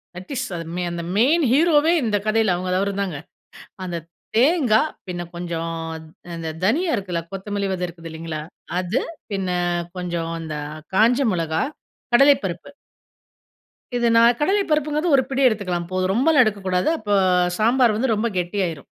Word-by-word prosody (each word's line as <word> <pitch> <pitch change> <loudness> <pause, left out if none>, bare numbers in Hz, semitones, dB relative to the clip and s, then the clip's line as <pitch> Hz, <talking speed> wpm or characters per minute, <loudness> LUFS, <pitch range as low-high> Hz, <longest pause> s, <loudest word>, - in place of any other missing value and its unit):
That 185 +8 -9
is 260 +1 -1
அது, 165 -1 -5 0.3
அந்த 170 -1 -4
main 300 +8 +4
ஹீரோவே 315 +2 +4
இந்த 210 -3 +1
கதையில, 215 -3 +3
அவங்க 180 +1 -3
அவருதாங்க. 195 -5 -2 0.7
அந்த 175 -2 -3 0.4
தேங்கா, 255 -4 +4 0.3
பின்ன 175 -1 -4
கொஞ்சம் 170 -1 -4 0.2
அ, 160 - -6 0.4
அந்த 165 -1 -5 0.2
தனியா 320 - +2
இருக்குல்ல, 180 -4 -3
கொத்தமல்லி 200 +1 -3
விதை 180 -1 -2
இருக்குதில்லைங்களா? 165 -2 -7 0.4
அது, 185 +7 -1 0.3
பின்ன 195 -2 -2 0.5
கொஞ்சம் 170 -2 -3
அந்த 160 -1 -5 0.4
காஞ்ச 235 +6 +4
மொளகா, 165 -2 -1 0.5
கடலைப்பருப்பு. 240 - +3 1.3
இது 240 -1 +2
நா 230 - +7 0.2
கடலை 395 +7 +2
பருப்புங்கிறது 305 +2 +1
ஒரு 260 - +3
பிடி 270 0 -1
எடுத்துக்கலாம், 185 -7 -1
போதும். 185 0 0
ரொம்பலா 290 +6 +4
எடுக்கக்கூடாது. 190 0 0
அப்ப 210 -1 -5 0.5
சாம்பார் 235 0 +3
வந்து 230 +1 +1
ரொம்ப 225 +3 0
கெட்டியாயிரும். 175 -5 -2
200 Hz, 135 wpm, -22 LUFS, 175-255 Hz, 1.3 s, நா